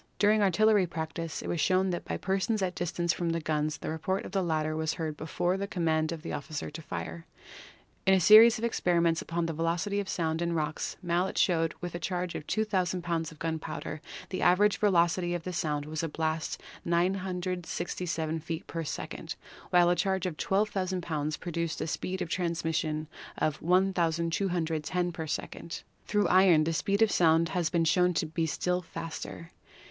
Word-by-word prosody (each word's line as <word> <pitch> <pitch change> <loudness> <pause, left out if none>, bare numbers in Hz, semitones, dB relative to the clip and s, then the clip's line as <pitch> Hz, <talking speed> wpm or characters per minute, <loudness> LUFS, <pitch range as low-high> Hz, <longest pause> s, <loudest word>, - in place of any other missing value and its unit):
During 210 +1 +4
artil 200 +2 +3
lery 210 -4 +5
practice 160 0 -4
it - - -6
was 170 - -1
shown 185 0 +3
that 175 - -4
by - - -3
persons 195 +2 0
at 185 -1 -1
distance 175 -1 -1
from 170 +1 -2
the 165 0 0
guns 155 -1 -1
the - - -4
report 190 +5 -2
of - - -7
the 195 0 +1
latter 155 -3 0
was 160 0 -1
heard 160 -3 -3
before 175 +4 -1
the 200 +1 -3
command 160 -4 0
of 165 -2 -6
the - - -4
officer 145 +1 -4
to 155 +2 -7
fire. 165 +1 -6 0.8
In 190 - +7
a - - +4
series 220 +6 +8
of 220 - -7
experiments 170 -7 +2
upon 170 0 -2
the 165 - -2
velocity 170 +5 0
of 200 -2 -3
sound 160 -2 -1
in 170 0 0
rocks 155 -1 -2
Mallet 175 +2 0
showed 165 -3 +2
that - - -30
with 175 - -4
a 175 - -4
charge 180 0 -2
of 150 - -6
2,000 185 -5 0
pounds 165 -2 -1
of 160 - -14
gunpowder 160 -1 -4 0.3
the 185 - -3
average 200 +4 +4
velocity 175 -3 +2
of 170 - -4
the 180 - -4
sound 150 -3 -1
of 155 +1 -3
a 165 - -1
blast 160 0 -2 0.2
was - - -6
967 180 -2 -1
feet 160 +1 -5
per 165 0 -4
second, 150 - -5 0.3
while 175 -1 +5
a - - +3
charge 190 -1 0
of 180 -4 -2
12,000 190 -1 0
pounds 155 -2 -2
produced 170 -2 -3
a - - -1
speed 185 +3 -2
of - - -6
trans 170 -2 -1
mission 155 -1 -1 0.3
of 155 -1 -1
1,210 175 -1 +1
per 160 -1 -5
second. 165 +2 -5 0.2
Through 210 -1 +2
iron 180 -4 +6
the 165 +1 0
speed 200 +6 +2
of 220 - +3
sound 165 -1 +4
has 170 -1 0
been 165 0 +1
shown 180 +2 +3
to - - +1
be 160 +1 -1
still 180 +3 0
faster. 165 0 -7
170 Hz, 195 wpm, -29 LUFS, 160-185 Hz, 0.8 s, series